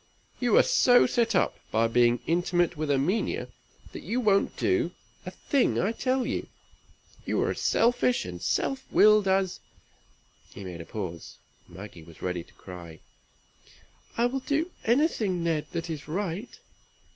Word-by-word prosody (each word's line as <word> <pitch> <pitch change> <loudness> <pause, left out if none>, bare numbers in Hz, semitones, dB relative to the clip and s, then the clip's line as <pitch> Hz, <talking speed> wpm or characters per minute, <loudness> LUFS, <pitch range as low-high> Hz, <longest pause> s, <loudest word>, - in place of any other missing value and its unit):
"You - - +3
are - - +7
so 265 - +5
set 230 -3 +1
up, - - +1
by 115 +1 +2
being 120 0 +3
intimate 175 +1 +1
with 155 -1 -3
Erminia, 145 +10 0 0.4
that - - -8
you 245 - -2
won't 200 -4 +2
do 370 -2 +1 0.3
a - - -1
thing 275 -3 0
I 195 - +1
tell 255 +2 -1
you; - - -3 0.8
you - - -1
are - - 0
as - - -5
selfish 245 +1 +2
and 90 -1 -7
self 270 0 -1
willed 210 -1 +5
as" 190 -1 +1 1.0
he 100 - -8
made 90 -3 -7
a - - -9
pause. 90 -6 -7 0.3
Maggie 95 0 -11
was 80 0 -15
ready 90 -2 -3
to - - -23
cry. 85 -4 -11 1.2
"I 235 - +3
will 260 +2 -1
do 305 +6 -1
anything, 225 - +1
Ned, 160 -3 -1
that 170 -1 -4
is 155 -4 -6
right." 190 +5 -3
180 Hz, 155 wpm, -27 LUFS, -, 1.2 s, are